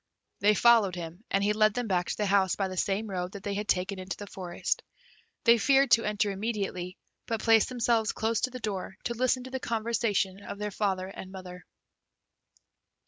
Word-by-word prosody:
They 210 +1 +4
followed 225 -5 +5
him, 175 +3 -7
and 195 0 +1
he 210 +1 +2
led 215 0 +3
them 245 -1 -1
back 180 -3 0
to - - -2
the 210 - 0
house 195 -2 +3
by 195 - -1
the 185 - -6
same 195 +4 0
road 180 -2 -4
that 200 -2 -8
they 205 - -2
had 205 +1 -3
taken 185 +1 0
into 185 0 -5
the 205 - -7
forest. 185 -3 -3 0.6
They 235 -1 +6
feared 275 +2 +4
to 230 - +6
enter 210 0 0
immediately, 195 -3 -3 0.3
but 225 -2 -2
placed 225 -2 +5
themselves 235 -3 +1
close 225 0 -1
to 255 - +1
the 255 0 -7
door 195 -4 -4
to 235 - -2
listen 255 +1 +1
to 260 - -9
the 260 - -3
conversation 220 -4 -1
of 200 - -7
their 210 0 -3
father 190 -2 -1
and 190 0 -9
mother. 180 -1 -10
205 Hz, 200 wpm, -29 LUFS, 190-230 Hz, 0.6 s, They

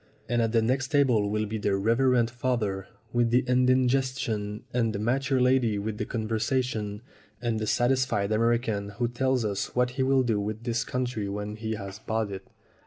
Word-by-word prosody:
And 120 -1 +1
at 115 -1 +1
the 115 -1 +3
next 130 +3 +1
table 125 -8 +3
will 105 +1 0
be 110 +1 -4
the 100 -1 +1
Reverend 115 +3 +2
Father 120 -6 -1 0.3
with 120 -1 +2
the 125 +2 +4
indigestion, 125 -4 +1
and 115 -2 +1
the - - -2
mature 130 +5 +1
lady 125 -4 +3
with 105 +1 -4
the 105 - -1
conversation, 110 -1 -2 0.4
and 115 -2 -1
the 110 - -2
satisfied 120 -5 +1
American 110 -2 +1
who 120 0 +1
tells 125 0 0
us 100 -1 -3
what 125 0 +2
he 130 +2 -3
will 130 0 +3
do 115 -4 +1
with 105 +2 -4
this 120 -1 0
country 125 -5 -2
when 105 +1 -4
he 110 0 -3
has 100 -1 -7
bought 110 -1 -2
it." 95 0 -7
115 Hz, 180 wpm, -27 LUFS, 105-125 Hz, 0.4 s, the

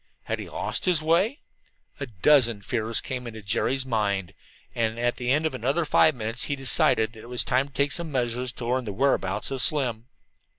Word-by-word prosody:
Had - - -3
he - - -7
lost - - -3
his 180 -4 +3
way? 175 - +1 0.6
A 140 - -4
dozen 115 0 +3
fears 115 0 -1
came 125 -2 -5
into 110 -2 -9
Jerry's 125 +6 0
mind, 100 -6 -1 0.4
and 115 -1 -1
at 120 +1 0
the 125 0 -3
end 150 +4 +2
of 160 - -1
another 135 +7 0
five 155 0 +4
minutes 115 +1 -3
he 145 - -2
decided 115 -4 +2
that 110 - -13
it 120 - -12
was 125 -1 +1
time 130 +2 +1
to 140 - -21
take 145 0 +1
some 165 +1 -2
measure 125 -1 -1
to 125 -1 -5
learn 125 +1 -1
the 105 - -4
whereabouts 100 -3 0
of 135 -1 -2
Slim. 125 -6 +1
125 Hz, 205 wpm, -25 LUFS, 115-140 Hz, 0.6 s, five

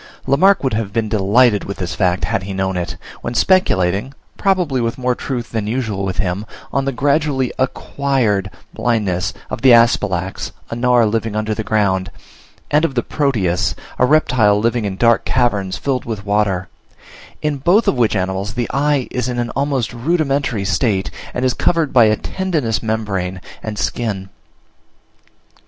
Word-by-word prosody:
Lamarck 185 +8 +4
would 130 - 0
have 105 -2 -2
been 110 0 -1
delighted 105 +2 +3
with 100 - -5
this 90 -2 -3
fact, 90 -2 0
had - - -1
he 95 0 -6
known 95 0 -1
it, 90 -1 -3 0.2
when 120 - -4
speculating 115 - +2 0.2
(probably 180 -10 +1
with 115 0 -2
more 125 -1 +1
truth 120 -2 -4
than 110 -2 -2
usual 110 -4 -2
with 95 -1 -3
him) 90 +3 -1 0.3
on 135 -1 +1
the 135 - 0
gradually 140 -1 +1
acquired 130 -6 0 0.2
blindness 105 -7 0 0.2
of - - -4
the 130 - +6
Asphalax, 105 -6 +2 0.2
a - - -2
Gnawer 120 -1 +3
living 110 0 -1
under 110 0 -1
ground, 100 -3 0 0.6
and 150 +2 +3
of 140 -5 0
the 120 - +1
Proteus, 110 - 0 0.2
a 125 - +4
reptile 125 -9 +3
living 115 0 0
in 100 -2 -2
dark 115 +1 +3
caverns 105 -7 0
filled 135 -3 -2
with 110 -3 -5
water; 100 -3 0 0.8
in 150 -1 0
both 175 - +3
of - - +4
which 120 -4 +1
animals 95 +4 -2
the 120 -1 -1
eye 140 -1 +1
is 125 0 -2
in 125 - -3
an 120 0 -1
almost 135 -5 -1
rudimentary 135 - 0
state, 100 -2 0 0.2
and 125 - -2
is 130 - +2
covered 165 -4 +1
by 120 -4 +7
a 110 0 +4
tendinous 160 - -2
membrane 100 -5 -2 0.2
and 110 -1 -5
skin. 100 -4 -2
115 Hz, 165 wpm, -18 LUFS, 100-135 Hz, 0.8 s, by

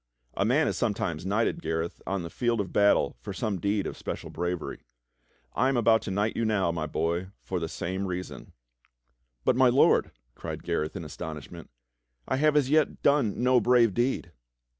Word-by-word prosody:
A 100 - 0
man 135 +8 +3
is - - -1
sometimes 95 - -1
knighted, 115 - 0
Gareth, 80 - -3
on 95 -2 -1
the 85 - -7
field 120 -2 0
of 100 - -3
battle 100 -10 +3
for 100 - -6
some 100 0 -2
deed 100 +1 0
of - - -4
special - - -6
bravery. 90 -1 -3 0.7
I 130 - +2
am 135 - +1
about 115 -1 +4
to - - -6
knight 100 +3 0
you 115 - 0
now, 105 -6 +1
my 80 -2 -3
boy, 85 +4 -1 0.2
for 95 - -3
the 80 -1 -3
same 95 +4 -3
reason." 90 0 -6 0.9
"But, - - +4
my 130 0 +5
Lord," 130 +4 +4 0.2
cried - - -7
Gareth 75 0 -2
in 85 -4 -5
astonishment, 80 +1 -8 0.6
"I - - 0
have 150 +1 +3
as 145 -3 +3
yet 155 +1 +1
done 130 -6 +2
no 125 0 +5
brave 120 -2 +4
deed!" 120 +5 -1
100 Hz, 180 wpm, -27 LUFS, 85-120 Hz, 0.9 s, my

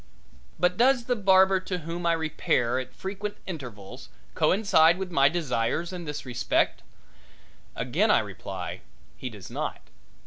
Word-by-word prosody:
But 180 +1 +2
does 250 +1 +4
the 245 - +1
barber 190 -2 +5
to 185 0 -4
whom 170 +1 -4
I 170 - +4
repair 140 -6 0
at 130 - -6
frequent 205 +2 -5
intervals 125 - -8 0.2
coincide 175 -4 +4
with 190 -1 -5
my 140 -4 +5
desires 160 +1 -1
in 175 -2 -6
this 150 -2 -5
respect? 120 -2 0 0.9
Again - - +1
I - - +6
reply - - -5 0.3
he 130 - -6
does 105 -5 -11
not. - - -3
170 Hz, 140 wpm, -27 LUFS, 135-190 Hz, 0.9 s, I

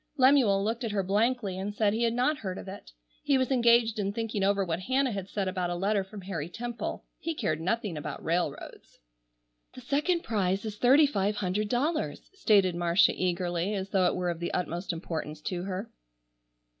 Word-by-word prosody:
Lemuel 255 -7 +5
looked 225 +4 -2
at 225 -3 -2
her 195 -2 +1
blankly 205 0 0
and 205 +2 -4
said 210 -1 +2
he 225 - -1
had 230 -1 +2
not 270 +5 +1
heard 185 -3 -4
of - - -8
it. 190 - -9 0.3
He 280 -2 +2
was 260 0 0
engaged 235 -3 +4
in 200 -1 0
thinking 220 -2 -2
over 200 0 +2
what 165 -1 -2
Hannah 260 +6 +1
had 195 -2 -5
said 200 -2 -2
about 185 -2 -1
a 175 - -2
letter 200 +2 +1
from 195 +1 -10
Harry 170 -5 -4
Temple. 240 +5 -5
He 330 -1 -3
cared 160 - -1
nothing 195 +1 -1
about 150 -1 -6
railroads. 165 -3 -3 0.8
"The 255 - -9
second 300 +7 0
prize 195 -2 0
is 210 -1 -5
thirty 270 +6 +6
five 210 -7 0
hundred 205 +1 -1
dollars," 300 +7 -1
stated 205 - +3
Marcia 175 +1 +4
eagerly, 180 +2 -1
as 195 0 -4
though 185 -2 +3
it - - 0
were 180 -1 -1
of 165 - -6
the 170 - -3
utmost 175 +1 -2
importance 160 -2 -5
to 180 +3 -3
her. 195 +3 -5
200 Hz, 195 wpm, -29 LUFS, 180-235 Hz, 0.8 s, thirty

